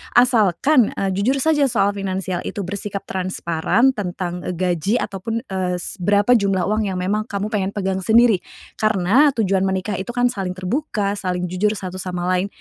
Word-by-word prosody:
Asalkan, 245 - +4
eee, 195 -1 -1
jujur 200 +8 +1
saja 300 -3 +3
soal 205 -5 +2
finansial 190 -2 -3
itu 205 - -4
bersikap 200 +1 -4
transparan 185 +5 0
tentang, 180 -5 -4
eee, 180 - -3
gaji, 180 +3 0
atau 195 -5 -4
pun, 225 +4 -3
eee, 185 -6 -2
s 180 +3 -5
berapa 205 +5 +2
jumlah 200 -6 +3
uang 215 +2 0
yang 190 - -3
memang 205 +4 -1
kamu 205 0 -3
pengen 200 -3 -1
pegang 190 -2 -1
sendiri. 220 +1 +4 0.4
Karena 215 +7 +4
tujuan 195 -4 +1
menikah 190 +1 -2
itu 190 - -6
kan 245 0 +2
saling 190 -4 -4
terbuka, 200 +1 -2
saling 180 -2 -2
jujur 190 +4 0
satu 185 -2 -6
sama 180 -1 -4
lain, 185 +2 0
195 Hz, 175 wpm, -20 LUFS, 185-215 Hz, 0.4 s, Asalkan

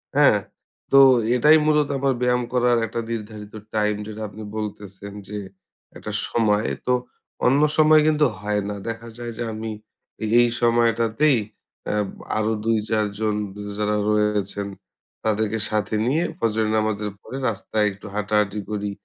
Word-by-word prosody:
হ্যাঁ? - - +6 0.5
তো 135 - +6 0.4
এটাই 150 +6 +6
মূলত 150 -1 +3
আমার 135 0 +1
ব্যায়াম 125 0 +2
করার 125 -1 +3
একটা 115 +2 -4
নির্ধারিত 105 -2 -6 0.2
টাইম, 105 -1 +2
যেটা 110 0 -7
আপনি 105 +2 -11
বলতেছেন 100 -2 -6 0.2
যে 105 0 -5 0.6
একটা 105 - -6 0.2
সময়, 110 -2 +1 0.2
তো 125 - +2 0.5
অন্য 135 +3 +4 0.2
সময় 155 0 +6
কিন্তু 155 -1 +4
হয় 105 0 -1
না। 105 - -3
দেখা 115 0 -5
যায় 120 -1 -5
যে - - -2
আমি 110 +1 -5 0.5
এ - - +1
এই 120 - +5
সময়টাতেই 115 +4 +3 0.5
অ্যাব 105 -1 0 0.3
আরো 110 +1 +1
২-৪ 110 -1 +1
জন 110 -1 0 0.4
যারা 105 0 0
রয়েছেন, 105 -1 0 0.6
তাদেরকে 110 0 0
সাথে 110 0 -1
নিয়ে 155 +7 +2
ফজরের 110 - 0
নামাজের 105 -1 -1
পরে 130 - -7
রাস্তায় 105 0 -1
একটু 100 +1 -13
হাঁটাহাঁটি 105 0 0
করি। 105 -1 -2
110 Hz, 140 wpm, -23 LUFS, 105-120 Hz, 0.6 s, হ্যাঁ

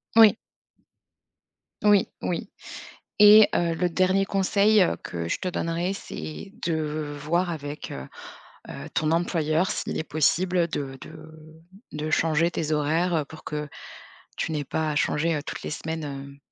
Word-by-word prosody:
Oui. 225 -2 +8 1.5
Oui, 205 -2 +4
oui. 175 +2 -3 0.7
Et 210 0 +9
heu, 170 -1 +1
le 175 +2 0
dernier 185 +2 +2
conseil 200 +2 +3 0.2
que 85 -1 -5
je - - -1
te 185 - -2
donnerai, 170 +1 -1
c'est 195 -1 -7
de 155 -2 -2
voir 170 +4 0
avec, 145 -2 -6
heu 65 0 -7 0.6
heu, - - -8
ton 155 -1 +1
employeur 165 0 +1
s'il - - -3
est 155 - -2
possible 170 +3 +1
de 140 -4 -4
de 155 0 -11 0.6
de 150 +1 -4
changer 165 +1 +2
tes 155 -2 -2
horaires 155 +1 +1
pour 160 - -12
que 150 -1 -4 0.7
tu - - -2
n'aies 150 -2 -2
pas 155 +3 -2
à 150 - -3
changer, 160 +3 +1
heu, 145 - -3
toutes - - -6
les - - -5
semaines, 145 -3 -6
160 Hz, 145 wpm, -25 LUFS, 150-180 Hz, 1.5 s, Et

